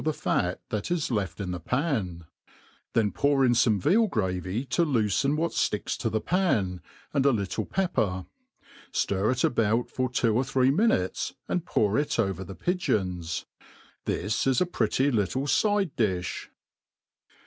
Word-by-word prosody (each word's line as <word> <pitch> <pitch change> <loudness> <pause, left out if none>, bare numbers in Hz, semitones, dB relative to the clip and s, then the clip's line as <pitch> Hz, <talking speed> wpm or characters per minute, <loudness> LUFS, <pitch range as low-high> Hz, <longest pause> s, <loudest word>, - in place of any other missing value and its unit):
the 155 - +1
fat 90 -10 -1
that 105 -2 -3
is 175 -6 -1
left 100 -6 -2
in 95 -3 -3
the 90 - -4
pan; 105 - -2 0.7
then 110 -3 +2
pour 140 -1 +2
in 125 - +4
foipe 115 -3 +3
veal 215 - +4
gravy 95 - -2
to 170 +6 +1
lopferi 135 - +1
what 165 +2 0
fticks - - -1
to - - -2
the 110 - 0
pan, 105 - 0 0.3
and 140 - +2
a 140 - +5
little 100 -6 -2
pepper 110 - 0 0.3
\ - - -23
ftir 100 +3 +1
it 130 0 -1
about 115 0 +1
for 130 -1 -1
^two 115 -2 +1
or 125 +4 +2
three 130 0 +2
minutes 165 - +1
a|id 175 -1 -2
pour, 105 +4 +2
l( 150 - +1
over 95 -4 0
the 95 +1 -9
pigeons. 90 - -1 0.6
This 110 +7 -1
is 130 -2 +3
a - - +3
pretty 145 -5 +1
little 115 +3 0
f|de 140 - 0 0.4
diib. 95 -5 -1
115 Hz, 160 wpm, -27 LUFS, 95-140 Hz, 0.7 s, a